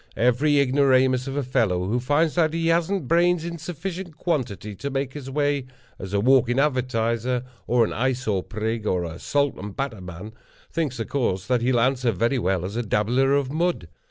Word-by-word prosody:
Every 135 Hz, +5 st, +3 dB
ignoramus 130 Hz, -1 st, +3 dB
of 135 Hz, -, -4 dB
a 145 Hz, -, 0 dB
fellow 110 Hz, -9 st, +1 dB
who 120 Hz, +5 st, 0 dB
finds 145 Hz, +5 st, +1 dB
that 165 Hz, -2 st, +2 dB
he 165 Hz, 0 st, +1 dB
hasn't 170 Hz, -1 st, +1 dB
brains 175 Hz, +1 st, +3 dB
in 170 Hz, -1 st, -5 dB
sufficient 175 Hz, +1 st, -6 dB
quantity 110 Hz, -, -2 dB
to 140 Hz, -, -4 dB
make 135 Hz, -1 st, -2 dB
his 140 Hz, -3 st, -7 dB
way 145 Hz, -1 st, 0 dB, 0.3 s
as 95 Hz, 0 st, -7 dB
a 100 Hz, -, +1 dB
walking 125 Hz, +1 st, +3 dB
advertiser, 125 Hz, -3 st, 0 dB, 0.2 s
or 120 Hz, -1 st, +4 dB
an -, -, -4 dB
eye 130 Hz, +4 st, +1 dB
sore 110 Hz, -7 st, -1 dB
prig, 110 Hz, +2 st, -3 dB
or 90 Hz, -1 st, +1 dB
a 85 Hz, 0 st, -6 dB
salt 145 Hz, -1 st, +1 dB
and 100 Hz, 0 st, -7 dB
batter 135 Hz, -8 st, -3 dB
man, 90 Hz, +4 st, -9 dB, 0.4 s
thinks, 145 Hz, -7 st, -2 dB
of 115 Hz, -, -3 dB
course, 95 Hz, -9 st, -1 dB
that 125 Hz, 0 st, +1 dB
he'll 125 Hz, 0 st, +2 dB
answer 125 Hz, 0 st, +2 dB
very 115 Hz, +6 st, 0 dB
well 95 Hz, -4 st, 0 dB
as 100 Hz, +3 st, -5 dB
a 120 Hz, -, 0 dB
dabbler 120 Hz, +5 st, +2 dB
of 140 Hz, -2 st, 0 dB
mud. 165 Hz, -, -1 dB
130 Hz, 195 wpm, -24 LUFS, 110-145 Hz, 0.4 s, or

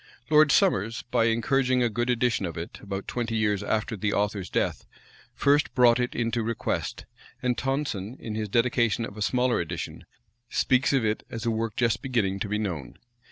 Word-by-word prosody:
Lord 150 Hz, -1 st, +6 dB
Somers, 115 Hz, -, +2 dB
by 120 Hz, -2 st, +3 dB
encouraging 125 Hz, +3 st, +2 dB
a -, -, +3 dB
good 120 Hz, +2 st, -2 dB
edition 120 Hz, -5 st, +1 dB
of 85 Hz, -, -7 dB
it, 85 Hz, -, -6 dB
about 100 Hz, -1 st, -5 dB
twenty 115 Hz, -2 st, -2 dB
years 105 Hz, -2 st, +1 dB
after 110 Hz, +3 st, -1 dB
the 105 Hz, 0 st, -1 dB
author's 100 Hz, -2 st, -1 dB
death, -, -, -1 dB, 0.5 s
first 145 Hz, +1 st, +2 dB
brought 120 Hz, -1 st, +5 dB
it 125 Hz, 0 st, -1 dB
into 115 Hz, 0 st, 0 dB
request; 115 Hz, 0 st, -3 dB, 0.4 s
and 125 Hz, -1 st, +1 dB
Tonson, 130 Hz, -5 st, -2 dB
in 110 Hz, -, -6 dB
his 105 Hz, -1 st, -3 dB
dedication 115 Hz, 0 st, +2 dB
of 100 Hz, -, -9 dB
a 105 Hz, -, -8 dB
smaller 125 Hz, +3 st, +2 dB
edition, 85 Hz, -, -5 dB, 0.4 s
speaks 130 Hz, 0 st, +2 dB
of 135 Hz, -5 st, +2 dB
it 105 Hz, 0 st, 0 dB
as 115 Hz, 0 st, -6 dB
a 115 Hz, -, +2 dB
work 110 Hz, -1 st, -2 dB
just 115 Hz, -3 st, +1 dB
beginning 105 Hz, -7 st, 0 dB
to 100 Hz, -, -3 dB
be 105 Hz, -, 0 dB
known. 85 Hz, -, -4 dB
115 Hz, 185 wpm, -26 LUFS, 105-125 Hz, 0.5 s, Lord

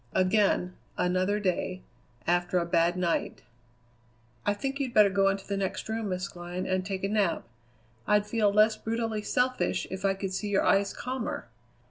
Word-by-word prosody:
Again, 185 Hz, -1 st, +2 dB, 0.2 s
another 185 Hz, +3 st, +1 dB
day, 185 Hz, -1 st, -1 dB, 0.4 s
after 175 Hz, +1 st, +1 dB
a 175 Hz, -, +1 dB
bad 170 Hz, +1 st, +2 dB
night: 175 Hz, -2 st, -1 dB, 1.0 s
"I 205 Hz, -, +3 dB
think 275 Hz, +5 st, -3 dB
you'd 260 Hz, -4 st, -3 dB
better 210 Hz, -2 st, +7 dB
go 195 Hz, 0 st, +3 dB
into 195 Hz, 0 st, -2 dB
the 200 Hz, -, -2 dB
next 195 Hz, -1 st, -2 dB
room, 220 Hz, -1 st, -2 dB
Miss 185 Hz, +1 st, -2 dB
Glynn, 175 Hz, 0 st, -6 dB
and 185 Hz, 0 st, 0 dB
take 190 Hz, 0 st, -4 dB
a -, -, +2 dB
nap. 200 Hz, -, 0 dB, 0.6 s
I'd 210 Hz, 0 st, +3 dB
feel 210 Hz, -2 st, +2 dB
less 215 Hz, +1 st, +5 dB
brutally 225 Hz, -1 st, -2 dB
selfish 255 Hz, +4 st, 0 dB
if 190 Hz, 0 st, -5 dB
I 195 Hz, -1 st, +2 dB
could 195 Hz, -1 st, -4 dB
see 205 Hz, +2 st, -2 dB
your 195 Hz, -1 st, +2 dB
eyes 195 Hz, 0 st, +3 dB
calmer. 250 Hz, -, -4 dB
195 Hz, 170 wpm, -28 LUFS, 185-215 Hz, 1.0 s, better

